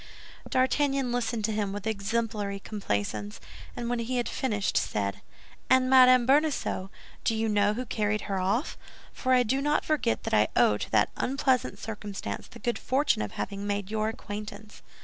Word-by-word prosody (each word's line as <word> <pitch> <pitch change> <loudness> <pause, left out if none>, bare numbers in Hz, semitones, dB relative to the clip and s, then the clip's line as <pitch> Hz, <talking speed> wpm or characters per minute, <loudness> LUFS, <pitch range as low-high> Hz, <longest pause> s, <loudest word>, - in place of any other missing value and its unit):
D'Artagnan 270 0 +1
listened 235 -3 -1
to 220 - -1
him 210 -2 -1
with 205 +1 -6
exemplary 210 -1 -2
complaisance, 105 - -3 0.4
and 240 - -4
when 240 0 -1
he 245 +2 -2
had 240 - 0
finished 210 -7 -1
said, 100 -2 -1 0.5
"And 260 0 +4
Madame 255 -2 +7
Bonacieux, 275 -8 +1 0.3
do 225 - +1
you 225 0 0
know 205 0 +2
who 250 +2 -3
carried 215 -2 -1
her 195 -2 -2
off?—For 230 - -3
I 250 -1 +5
do 265 +4 0
not 295 +1 +1
forget 300 -7 0
that - - -4
I 105 0 +5
owe 105 - +4
to - - -5
that 105 -1 +3
unpleasant 265 -1 +1
circumstance 205 - -6
the - - -13
good 240 +2 -2
fortune 275 - +1
of 105 - -4
having 200 0 -4
made 205 -1 -2
your 215 0 0
acquaintance." 210 -1 -8
220 Hz, 170 wpm, -28 LUFS, 200-255 Hz, 0.5 s, Madame